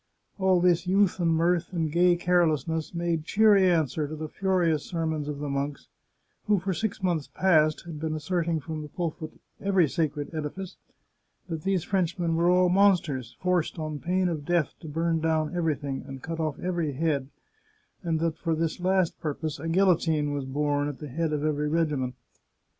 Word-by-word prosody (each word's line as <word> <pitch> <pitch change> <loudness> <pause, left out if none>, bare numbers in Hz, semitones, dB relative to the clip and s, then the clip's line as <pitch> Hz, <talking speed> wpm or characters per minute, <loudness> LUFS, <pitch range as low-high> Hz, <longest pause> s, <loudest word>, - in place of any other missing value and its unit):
All 190 -1 +4
this 175 0 +2
youth 195 0 +3
and 170 -1 +2
mirth 170 +2 +1
and 160 -3 -1
gay 175 +2 +4
carelessness 165 -3 +1
made 170 -2 -1
cheery 200 +1 +5
answer 155 -3 +1
to 155 - -6
the 155 0 -5
furious 175 -4 +1
sermons 160 -3 -2
of 150 -1 -4
the 145 +1 -4
monks, 140 0 -3 0.6
who 210 -1 +3
for 190 +1 -2
six 215 +1 -3
months 170 -5 0
past 155 -5 +3
had 165 -3 -7
been 155 0 -2
asserting 165 +1 -1
from 155 +1 -5
the 150 - -7
pulpit 160 -1 -4
of - - -25 0.2
every 190 -4 +3
sacred 150 +1 -2
edifice 160 +5 -5 0.7
that 165 -2 -3
these 190 -1 0
Frenchmen 175 -3 0
were 170 +1 +3
all 180 0 +4
monsters, 175 - +2
forced, 180 -2 0
on 155 -2 -4
pain 185 +3 0
of 160 -4 -3
death, 170 -1 +1
to 160 - -10
burn 165 +2 0
down 160 0 0
everything, 150 -5 -1
and 135 -1 -8
cut 165 0 -5
oflf 155 -2 -1
every 170 -5 -1
head, 140 -2 -1 0.7
and 165 -4 -1
that 165 -1 -1
for 165 -2 0
this 165 +1 -2
last 185 -1 +1
purpose 155 0 -3
a 165 - -5
guil 190 +4 +3
lotine 160 -5 +2
was 140 -2 -3
borne 145 +1 0
at 145 - -7
the 150 - -8
head 160 +4 -1
of 150 0 -1
every 150 -1 0
regiment. 150 -6 0
165 Hz, 185 wpm, -27 LUFS, 150-180 Hz, 0.7 s, cheery